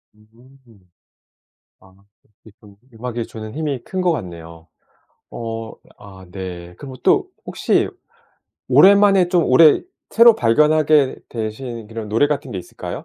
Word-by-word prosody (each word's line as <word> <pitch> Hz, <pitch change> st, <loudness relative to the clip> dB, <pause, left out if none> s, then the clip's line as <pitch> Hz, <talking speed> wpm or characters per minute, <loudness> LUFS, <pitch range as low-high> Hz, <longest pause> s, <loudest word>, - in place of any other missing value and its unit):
음. 115 Hz, -2 st, -24 dB, 0.9 s
아 95 Hz, 0 st, -21 dB, 0.5 s
기쁨 105 Hz, -2 st, -19 dB, 0.2 s
음악이 115 Hz, 0 st, -6 dB
주는 110 Hz, -1 st, -9 dB
힘이 150 Hz, -4 st, -3 dB
큰 190 Hz, -, -4 dB
것 180 Hz, -2 st, +2 dB
같네요. 85 Hz, -, -9 dB, 0.6 s
어 115 Hz, -1 st, -6 dB, 0.3 s
아 95 Hz, -2 st, -14 dB
네. 90 Hz, -2 st, -8 dB
그럼 135 Hz, +3 st, -10 dB
또 280 Hz, -, +2 dB, 0.2 s
혹시 -, -, 0 dB, 0.8 s
오랜만에 200 Hz, -2 st, +5 dB
좀 175 Hz, -2 st, +2 dB
올해 150 Hz, +4 st, +5 dB, 0.3 s
새로 230 Hz, 0 st, +6 dB
발견하게 150 Hz, +3 st, +2 dB
되신 115 Hz, 0 st, -6 dB
그런 110 Hz, -1 st, -8 dB
노래 115 Hz, +7 st, +2 dB
같은 145 Hz, -2 st, -4 dB
게 95 Hz, -, -5 dB
있을까요? -, -, -8 dB
115 Hz, 230 characters per minute, -19 LUFS, 105-150 Hz, 0.9 s, 새로